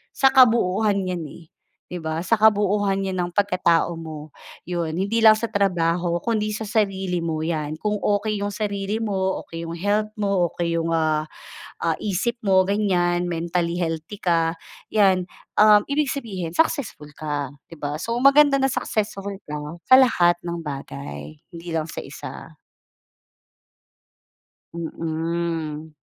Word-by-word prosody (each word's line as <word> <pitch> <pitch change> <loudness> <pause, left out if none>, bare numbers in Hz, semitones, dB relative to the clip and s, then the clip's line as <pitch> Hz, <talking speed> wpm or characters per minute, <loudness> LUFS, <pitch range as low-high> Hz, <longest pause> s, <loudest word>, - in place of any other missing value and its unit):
sa 270 0 +4
kabuuhan 220 -5 +4
'yan, 180 -2 -3
eh, 170 - -13 0.4
'di 180 - -5
ba, 160 +1 -3
sa 230 - +3
kabuuhan 205 -2 +3
'yan 190 -1 -3
ng 175 0 -1
pagkatao 180 -4 +2
mo, 155 -2 -8 0.4
'yon 170 -3 -2
hindi 200 +6 0
lang 220 - +10
sa 230 +1 -3
trabaho 175 -3 +1
kundi 215 -2 -1
sa 220 +1 -4
sarili 195 -4 0
mo 160 -2 -2
'yan. 155 -2 -2
Kung 210 0 0
okey 205 +1 0
'yong 205 0 -2
sarili 205 +1 -2
mo, 190 -3 -1
okey 165 0 -7
yung 165 - -5
health 210 +4 0
mo, 195 -4 +2
okey 170 -1 -1
'yong, 165 0 -1
ah, 155 -1 +1 0.6
ah, 165 -1 0
isip 215 +4 -1
mo 190 -1 +5
ganiyan 180 -4 +1
and - - -2
mentally 170 +1 -1
healthy 165 +4 -4
ka, 165 -2 +2 0.4
'yan, 190 -4 +4 0.3
um, 210 0 +7
ibig 285 -1 +1
sabihin 190 -11 -5
successful 245 - 0
ka 145 -3 -3 0.2
'di 165 - -11
ba. 145 +1 -3
So, 230 - -3
maganda 280 +1 +6
na 270 - +3
successful 200 -2 -2 0.2
ka 150 +3 -6
sa 260 - +9
lahat 175 -10 +4
ng 170 -1 -4
bagay, 75 - -7
hindi 170 0 -9
lang 160 -1 -1
sa - - -6
1 - - -9 2.2
Mm. 165 -1 -3
180 Hz, 145 wpm, -23 LUFS, 165-210 Hz, 2.2 s, lang